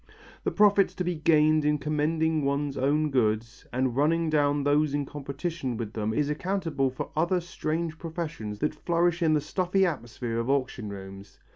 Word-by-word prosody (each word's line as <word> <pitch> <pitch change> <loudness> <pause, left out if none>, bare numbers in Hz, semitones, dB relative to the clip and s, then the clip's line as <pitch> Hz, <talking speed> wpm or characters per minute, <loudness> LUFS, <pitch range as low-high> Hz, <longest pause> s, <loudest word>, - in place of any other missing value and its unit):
The - - +1
profits 205 -1 +4
to 180 - -2
be 180 0 -1
gained 155 -1 +4
by 150 0 +2
commending 155 +1 0
one's 140 0 -1
own 145 +3 +1
goods 115 -1 0
and 130 -1 0
running 160 +3 +2
down 145 -1 +2
those 145 0 +2
in 145 -1 -1
competition 140 -1 -4
with 110 -2 -5
them 110 0 -1
is 145 +5 +1
accountable 160 -3 -1
for 130 - -6
other 170 +4 +2
strange 165 -2 -3
professions 160 -11 -5
that 150 - +1
flourish 175 0 0
in 160 -2 +4
the 150 - +1
stuffy 185 +4 +1
atmosphere 120 -6 -3
of 115 +2 -2
auction 130 -5 -1
rooms. 95 0 -10
150 Hz, 170 wpm, -27 LUFS, 130-165 Hz, -, profits